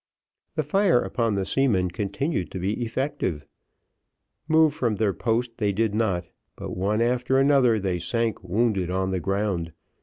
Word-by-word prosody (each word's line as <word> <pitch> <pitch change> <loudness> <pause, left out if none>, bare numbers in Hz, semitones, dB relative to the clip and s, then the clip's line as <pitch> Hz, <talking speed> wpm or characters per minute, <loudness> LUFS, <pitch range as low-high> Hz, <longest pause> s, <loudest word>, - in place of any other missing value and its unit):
The 155 - 0
fire 180 0 +3
upon 110 +3 -1
the 95 -1 -1
seamen 100 -10 +1
continued 100 - -2
to - - -6
be 100 +7 -1
effective. 115 - -2 1.0
Move 160 -1 +4
from 120 -6 0
their 105 -1 +1
post 115 +2 -1
they 105 -2 +1
did 110 +1 0
not, 100 -5 0 0.3
but - - -6
one 105 +4 0
after 125 +2 +1
another 135 -5 +4
they 95 -3 -1
sank 115 +1 -1
wounded 95 -1 0
on 95 +1 -1
the 95 - -1
ground. 95 -4 -2
110 Hz, 155 wpm, -25 LUFS, 95-125 Hz, 1.0 s, Move